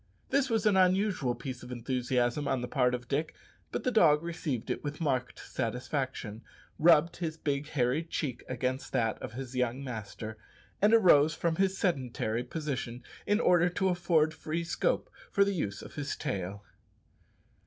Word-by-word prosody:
This 270 Hz, 0 st, +2 dB
was 225 Hz, -2 st, +1 dB
an 210 Hz, -2 st, +4 dB
unusual 185 Hz, -, +3 dB
piece 130 Hz, -2 st, -6 dB
of 125 Hz, -, -9 dB
enthusiasm 125 Hz, +2 st, 0 dB
on 130 Hz, -, 0 dB
the 125 Hz, -, -3 dB
part 125 Hz, -2 st, +2 dB
of 120 Hz, -1 st, -8 dB
Dick; 155 Hz, +3 st, -1 dB, 0.4 s
but -, -, -3 dB
the 255 Hz, -, +1 dB
dog 165 Hz, -9 st, +5 dB
received 160 Hz, -8 st, -3 dB
it -, -, -3 dB
with 145 Hz, 0 st, -4 dB
marked 130 Hz, -6 st, -1 dB
satisfaction, 125 Hz, -2 st, -3 dB, 0.4 s
rubbed 165 Hz, +1 st, +5 dB
his 165 Hz, -2 st, -3 dB
big 145 Hz, -2 st, -2 dB
hairy 135 Hz, 0 st, +1 dB
cheek 145 Hz, -6 st, -3 dB
against 130 Hz, +1 st, -2 dB
that 115 Hz, -4 st, 0 dB
of -, -, -6 dB
his 130 Hz, 0 st, -6 dB
young 125 Hz, +1 st, 0 dB
master, 110 Hz, -3 st, -6 dB, 0.4 s
and 210 Hz, +2 st, +5 dB
arose 155 Hz, -8 st, +6 dB
from 165 Hz, 0 st, 0 dB
his 195 Hz, 0 st, +2 dB
sedentary 125 Hz, -, -1 dB
position 125 Hz, -4 st, -4 dB, 0.2 s
in 205 Hz, +1 st, +3 dB
order 175 Hz, -4 st, +4 dB
to 190 Hz, +2 st, 0 dB
afford 170 Hz, -3 st, +2 dB
free 160 Hz, +1 st, -3 dB
scope -, -, 0 dB, 0.2 s
for 200 Hz, -, +4 dB
the 200 Hz, -, 0 dB
use 105 Hz, -, -3 dB
of -, -, -11 dB
his 145 Hz, -1 st, -3 dB
tail. 100 Hz, -6 st, -4 dB
145 Hz, 165 wpm, -30 LUFS, 125-170 Hz, 0.4 s, arose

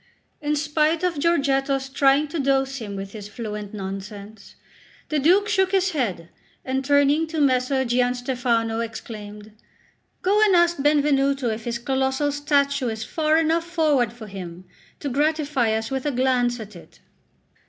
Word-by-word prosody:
In 300 Hz, 0 st, 0 dB
spite 305 Hz, +2 st, +1 dB
of 350 Hz, -5 st, 0 dB
Giorgetto's 275 Hz, -4 st, +1 dB
trying 275 Hz, +2 st, +3 dB
to 330 Hz, -, -4 dB
dose 270 Hz, 0 st, +1 dB
him 210 Hz, -5 st, -6 dB
with 195 Hz, 0 st, -6 dB
his 205 Hz, -2 st, -8 dB
fluent 210 Hz, -2 st, -6 dB
nonsense, 200 Hz, +1 st, -8 dB, 0.5 s
the 305 Hz, -, +1 dB
Duke 370 Hz, +8 st, +4 dB
shook 385 Hz, -3 st, +1 dB
his 380 Hz, -1 st, +2 dB
head, 195 Hz, -, -2 dB, 0.4 s
and 265 Hz, +1 st, -1 dB
turning 285 Hz, +3 st, +3 dB
to 315 Hz, 0 st, -4 dB
Messer 265 Hz, -1 st, +2 dB
Gianstefano, 245 Hz, -2 st, 0 dB
exclaimed: 215 Hz, -2 st, -7 dB, 0.7 s
"Go 405 Hz, +3 st, +3 dB
and 405 Hz, -3 st, +4 dB
ask 345 Hz, 0 st, +3 dB
Benvenuto 280 Hz, -3 st, +2 dB
if 220 Hz, 0 st, -4 dB
his 235 Hz, -1 st, -2 dB
colossal 265 Hz, +3 st, 0 dB
statue 280 Hz, -2 st, +1 dB
is 220 Hz, -1 st, -3 dB
far 310 Hz, +5 st, +1 dB
enough 325 Hz, +1 st, +2 dB
forward 300 Hz, -9 st, +1 dB
for 235 Hz, -2 st, -11 dB
him 185 Hz, -3 st, -8 dB, 0.4 s
to 290 Hz, -, -5 dB
gratify 290 Hz, -3 st, +1 dB
us 220 Hz, +3 st, -2 dB
with 265 Hz, +1 st, -2 dB
a -, -, +1 dB
glance 250 Hz, -2 st, +1 dB
at 215 Hz, -2 st, -9 dB
it." 170 Hz, -, -15 dB
270 Hz, 155 wpm, -23 LUFS, 225-300 Hz, 0.7 s, Duke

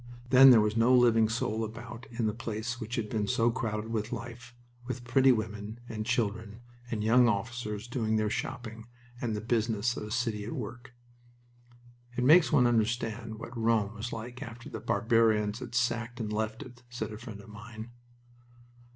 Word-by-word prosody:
Then 135 Hz, +1 st, +9 dB
there 120 Hz, -4 st, +8 dB
was 105 Hz, 0 st, 0 dB
no 115 Hz, +3 st, +5 dB
living 115 Hz, -3 st, +5 dB
soul 115 Hz, -1 st, -1 dB
about 115 Hz, +2 st, -8 dB
in 115 Hz, -1 st, -2 dB
the 105 Hz, -, 0 dB
place 115 Hz, +1 st, -4 dB
which 115 Hz, +2 st, -4 dB
had 110 Hz, -2 st, -2 dB
been 105 Hz, -1 st, -1 dB
so 115 Hz, +3 st, +2 dB
crowded 110 Hz, -3 st, -3 dB
with 110 Hz, 0 st, -2 dB
life, 120 Hz, +1 st, -7 dB, 0.3 s
with 125 Hz, -1 st, -4 dB
pretty 130 Hz, +2 st, +4 dB
women 110 Hz, -1 st, -3 dB
and 110 Hz, -1 st, -5 dB
children, 110 Hz, -2 st, -1 dB, 0.3 s
and 110 Hz, -2 st, -2 dB
young 120 Hz, +3 st, +5 dB
officers 110 Hz, 0 st, -3 dB
doing 115 Hz, -3 st, -1 dB
their 110 Hz, -1 st, +1 dB
shopping, 115 Hz, -1 st, -5 dB, 0.3 s
and 115 Hz, -3 st, -1 dB
the 105 Hz, -, -3 dB
business 115 Hz, 0 st, 0 dB
of -, -, -5 dB
a -, -, -8 dB
city 115 Hz, -3 st, -1 dB
at 110 Hz, -, -5 dB
work. 120 Hz, +2 st, -7 dB, 1.2 s
"It 125 Hz, -, +1 dB
makes 160 Hz, +6 st, +6 dB
one 135 Hz, -5 st, +5 dB
understand 115 Hz, -1 st, 0 dB
what 115 Hz, +3 st, -9 dB
Rome 110 Hz, -3 st, +1 dB
was 110 Hz, +2 st, -5 dB
like 120 Hz, +2 st, -7 dB
after 120 Hz, 0 st, -8 dB
the -, -, -5 dB
barbarians 110 Hz, -1 st, +2 dB
had 120 Hz, -2 st, -7 dB
sacked 120 Hz, 0 st, 0 dB
and 105 Hz, -2 st, -3 dB
left 110 Hz, +4 st, -2 dB
it," 125 Hz, -2 st, -14 dB
said 120 Hz, -2 st, -5 dB
a -, -, -7 dB
friend 115 Hz, -4 st, -9 dB
of 100 Hz, -, -13 dB
mine. 110 Hz, +2 st, -9 dB
115 Hz, 180 wpm, -30 LUFS, 110-120 Hz, 1.2 s, Then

